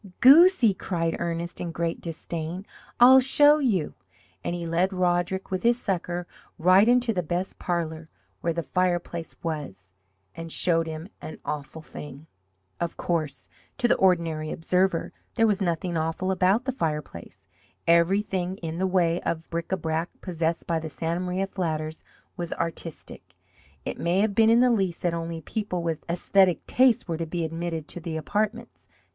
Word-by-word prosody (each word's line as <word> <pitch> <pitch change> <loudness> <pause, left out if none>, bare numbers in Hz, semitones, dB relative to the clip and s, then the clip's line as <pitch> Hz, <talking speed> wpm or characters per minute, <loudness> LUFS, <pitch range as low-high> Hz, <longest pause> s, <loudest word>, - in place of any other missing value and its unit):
"Goosey!" 275 - +7
cried 165 -3 -2
Ernest, 170 0 -3
in 170 - -3
great 165 0 -2
disdain. 170 +2 -5 0.3
"I'll 255 +2 +9
show 290 +3 +5
you!" 210 - 0 0.5
and 175 - -2
he 170 -1 -4
led 170 +3 +1
Roderick, 180 +1 0
with 185 -1 -1
his 235 +1 +3
sucker, 180 -3 -2 0.3
right 185 +5 +5
into 245 -1 +3
the 180 - 0
best 175 +3 -3
parlour, 160 -2 -3 0.3
where 170 - -1
the 170 0 -3
fireplace 175 -2 -1
was, 145 - -5 0.4
and 165 0 -7
showed 165 -1 +3
him 160 +2 -6
an 155 - -8
awful 150 +2 -5
thing. 150 -1 -10 0.5
Of 170 -1 -3
course, 155 -5 -2 0.3
to 240 - +2
the - - +4
ordinary 165 -4 +1
observer, 180 +1 0 0.2
there 225 - +4
was 210 -2 +1
nothing 175 -1 -1
awful 165 +4 -1
about 190 +6 +2
the 260 - 0
fireplace. 150 - -5 0.4
Everything 185 +2 +2
in 165 -1 -5
the 190 - +1
way 175 -2 +1
of 165 -1 -3
bric 170 +1 -4
a 190 - +1
brac 160 0 -2
possessed 165 -2 -2
by 165 -1 0
the 160 0 -6
Santa 165 +3 -2
Maria 185 +1 -1
flatters 160 -5 -3 0.3
was 175 -1 -4
artistic. 160 - -6 0.5
It - - -4
may 175 +3 +1
have 210 -1 +1
been 220 +2 +5
in 230 +1 +5
the 250 0 +5
Lease 190 -7 0
that 175 -1 0
only 165 0 -4
people 180 -1 -3
with 165 -2 -2
esthetic 180 +1 +2
tastes 250 -3 +3
were 165 -2 -2
to 165 0 -3
be 170 0 -2
admitted 165 -1 -4
to - - -5
the 165 -1 -4
apartments. 215 +8 -3
175 Hz, 165 wpm, -26 LUFS, 165-190 Hz, 0.5 s, I'll